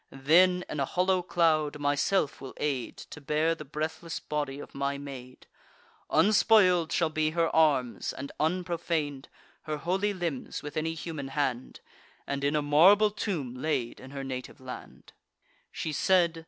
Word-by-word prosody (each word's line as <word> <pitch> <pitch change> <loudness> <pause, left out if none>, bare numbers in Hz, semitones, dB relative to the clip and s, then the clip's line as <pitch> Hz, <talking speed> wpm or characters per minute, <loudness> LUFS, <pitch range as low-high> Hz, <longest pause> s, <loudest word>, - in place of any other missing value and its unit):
Then, 180 +7 +4
in 150 - -5
a 135 - +1
hollow 185 +4 +1
cloud, 155 -4 +1
myself 145 +3 0
will 135 - -8
aid 135 -5 -2
To 150 - -10
bear 155 +3 +1
the 165 - -8
breathless 155 +3 -4
body 145 -2 -3
of - - -10
my 140 0 -2
maid: 130 -3 -10 0.6
Unspoil'd 195 -5 +4
shall 165 -2 +1
be 155 0 +1
her 165 +1 0
arms, 140 -7 +2
and 140 +1 -7
unprofan'd 165 -4 -1 0.4
Her 155 -1 -2
holy 190 +6 0
limbs 170 -10 -4
with 145 -1 -7
any 160 +1 -1
human 155 -3 -5
hand, 135 -3 -2 0.4
And 140 0 -3
in 145 +2 +1
a 150 - +1
marble 190 +9 +6
tomb 170 - -3
laid 130 -2 -2
in 130 - -11
her 140 0 -6
native 130 -1 -6
land." 130 -1 -10 0.6
She 155 - -4
said. 170 0 +3
155 Hz, 155 wpm, -29 LUFS, 140-170 Hz, 0.6 s, marble